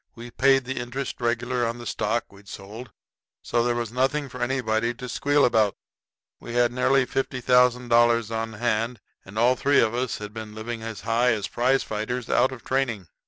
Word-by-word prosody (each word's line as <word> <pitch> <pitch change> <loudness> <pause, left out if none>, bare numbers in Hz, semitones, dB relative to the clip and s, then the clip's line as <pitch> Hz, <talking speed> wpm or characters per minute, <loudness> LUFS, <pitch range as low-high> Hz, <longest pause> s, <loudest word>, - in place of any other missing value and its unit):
We 120 +1 -10
paid 135 +1 +3
the 130 +1 -3
interest 125 +2 -5
regular 120 +1 0
on 115 0 -1
the 120 - -9
stock 110 0 -2
we'd 100 0 -17
sold, 110 +7 -9 0.5
so 120 - +1
there 120 0 +1
was 120 -2 -3
nothing 135 +3 0
for 125 0 -9
anybody 120 -2 0
to 125 +1 -7
squeal 145 +3 +2
about. 110 -4 +2 0.6
We 120 - -8
had 120 0 +3
nearly 130 +1 +2
$50,000 120 -3 +2
on 110 0 -3
hand 115 +1 -1 0.2
and 95 +3 -11
all 120 +3 +4
three 140 +2 +3
of 110 -1 +2
us 125 0 -2
had 105 0 -8
been 110 -1 -8
living 115 +1 -5
as 115 -1 -6
high 115 +2 +2
as 105 -3 -3
prize 130 +3 +1
fighters 110 +3 -4
out 130 - +3
of 130 -3 -9
training. 120 -9 -1
120 Hz, 185 wpm, -25 LUFS, 110-125 Hz, 0.6 s, all